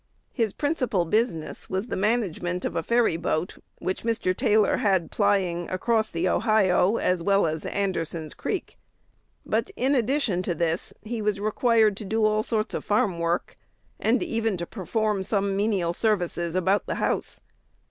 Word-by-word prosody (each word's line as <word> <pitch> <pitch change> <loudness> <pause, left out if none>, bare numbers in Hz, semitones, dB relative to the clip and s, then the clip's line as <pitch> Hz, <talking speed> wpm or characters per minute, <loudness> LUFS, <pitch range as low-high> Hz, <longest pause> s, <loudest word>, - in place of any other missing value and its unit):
His 225 -5 0
principal 255 - 0
business 175 -4 -1
was 190 +3 -1
the - - -4
management 190 -4 -1
of - - -3
a - - +1
ferry 235 -2 +2
boat 170 0 -2 0.2
which 185 - -3
Mr. 225 -5 0
Taylor 210 +1 +3
had 190 -5 +1
plying 190 -4 +1
across 220 +3 +1
the 170 +2 -1
Ohio, 210 -1 +3
as 180 -1 +1
well 195 +2 +3
as 155 -1 -2
Anderson's 165 -5 -2
Creek. - - -4 0.7
But, - - 0
in 270 -1 +1
addition 250 -6 +1
to 175 -2 -2
this, 170 0 -1
he 225 +1 -4
was 210 -1 0
required 215 0 +3
to 215 - -6
do 220 +2 +1
all 215 0 +2
sorts 215 -1 -1
of - - -3
farm 205 -5 +1
work, 170 +1 -2 0.4
and 235 +3 +2
even 225 -3 -1
to 170 - -3
perform 210 +1 -1
some 195 0 0
menial 195 -4 +1
services 175 -5 0
about 190 +3 +1
the - - -2
house. - - -1
200 Hz, 160 wpm, -25 LUFS, 175-220 Hz, 0.7 s, Taylor